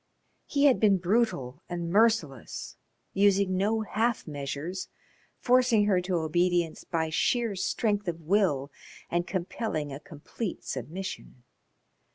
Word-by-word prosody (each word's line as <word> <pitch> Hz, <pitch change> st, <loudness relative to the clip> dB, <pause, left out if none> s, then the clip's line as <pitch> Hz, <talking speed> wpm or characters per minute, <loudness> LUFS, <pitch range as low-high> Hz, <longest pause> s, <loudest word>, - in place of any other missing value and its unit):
He 285 Hz, 0 st, +2 dB
had 270 Hz, -3 st, +5 dB
been 205 Hz, -3 st, +5 dB
brutal 180 Hz, -, 0 dB
and 170 Hz, -1 st, -3 dB
merciless, 200 Hz, -, +1 dB, 0.4 s
using 200 Hz, -1 st, +3 dB
no 210 Hz, +4 st, +1 dB
half 220 Hz, +2 st, 0 dB
measures, 145 Hz, +5 st, -5 dB, 0.5 s
forcing 245 Hz, -4 st, +4 dB
her 190 Hz, -3 st, +3 dB
to 180 Hz, 0 st, -2 dB
obedience 170 Hz, +1 st, +1 dB
by 160 Hz, -2 st, -2 dB
sheer 230 Hz, +5 st, +1 dB
strength 205 Hz, +1 st, 0 dB
of 170 Hz, -1 st, -2 dB
will 160 Hz, -6 st, +1 dB, 0.4 s
and 175 Hz, +1 st, 0 dB
compelling 170 Hz, -5 st, -3 dB
a 135 Hz, -, -6 dB
complete 180 Hz, +5 st, -6 dB
submission. 170 Hz, -7 st, -6 dB
185 Hz, 120 wpm, -28 LUFS, 160-215 Hz, 0.5 s, had